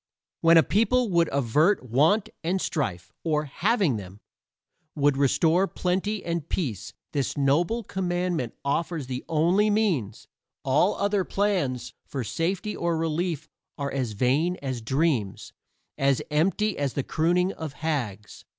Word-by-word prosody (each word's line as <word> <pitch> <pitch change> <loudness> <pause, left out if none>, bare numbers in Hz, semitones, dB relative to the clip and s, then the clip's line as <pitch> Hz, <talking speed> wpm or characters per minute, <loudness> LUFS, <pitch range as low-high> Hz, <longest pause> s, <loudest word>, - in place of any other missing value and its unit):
When 165 0 +6
a 160 - +7
people 230 +2 +2
would 170 -2 +3
avert 140 - +2
want 155 - +3
and 180 +4 0
strife, 95 - -3
or, 155 -2 0
having 180 - +1
them, 95 0 -9 0.8
would 145 -2 +3
restore 160 +7 +3
plenty 190 +3 -2
and 170 -3 -3
peace, 110 - -3 0.2
this 140 -1 -2
noble 165 +12 +2
commandment 175 - -2
offers 155 +1 -1
the 125 0 -5
only 175 +7 +3
means 180 - 0 0.4
all 150 +9 +3
other 200 -1 +1
plans 180 - -1
for 135 -3 -4
safety 180 - -2
or 170 -1 -1
relief 160 -1 -2 0.3
are 140 -1 -3
as 130 -5 -2
vain 140 - +1
as 130 -4 -4
dreams, 130 - -1 0.5
as 135 -1 +3
empty 195 +7 +1
as 140 -3 -1
the 140 - 0
crooning 175 +6 +1
of 160 -3 -6
hags. 135 -10 -4
160 Hz, 135 wpm, -26 LUFS, 135-180 Hz, 0.8 s, a